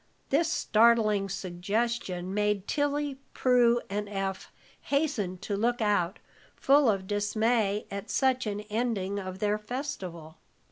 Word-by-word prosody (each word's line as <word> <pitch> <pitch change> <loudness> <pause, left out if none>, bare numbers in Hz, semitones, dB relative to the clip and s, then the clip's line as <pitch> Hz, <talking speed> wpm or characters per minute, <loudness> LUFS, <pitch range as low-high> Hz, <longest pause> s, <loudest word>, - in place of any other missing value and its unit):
This 320 +4 +2
startling 215 - +3
suggestion 190 0 -2
made 210 -1 0
Tilly, 290 -1 -1 0.2
Prue, 240 -2 +4
and 205 +1 -3
Eph 195 -1 -4 0.3
hasten 270 - 0
to 200 +3 -4
look 235 +4 0
out, 205 -5 +1 0.4
full 280 -2 +4
of 195 -3 0
dismay 210 +1 +1
at 200 +1 -6
such 260 -3 +1
an 205 0 -3
ending 210 -2 -2
of 185 -1 -6
their 210 +1 0
festival. 195 - -6
210 Hz, 125 wpm, -28 LUFS, 195-240 Hz, 0.4 s, Prue